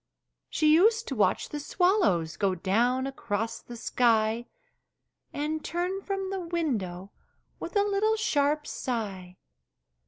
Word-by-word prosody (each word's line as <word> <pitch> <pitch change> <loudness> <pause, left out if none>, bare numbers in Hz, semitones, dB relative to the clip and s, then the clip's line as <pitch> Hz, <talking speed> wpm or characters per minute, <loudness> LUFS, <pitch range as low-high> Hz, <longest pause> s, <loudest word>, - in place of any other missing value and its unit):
She 310 -1 +3
used 445 +7 +4
to 270 - -3
watch 200 -5 +1
the 295 - -4
swallows 290 - +2
Go 195 -2 +1
down 240 +9 +1
across 225 -5 -3
the 240 - -10
sky, 230 0 +1 0.8
And 305 +2 -3
turn 360 +3 -2
from 390 -1 -3
the 390 - -2
window 220 - -3 0.5
With - - -7
a 405 - +4
little 410 +2 +2
sharp 295 -8 +1
sigh. 195 -10 -4
280 Hz, 125 wpm, -28 LUFS, 215-360 Hz, 0.8 s, used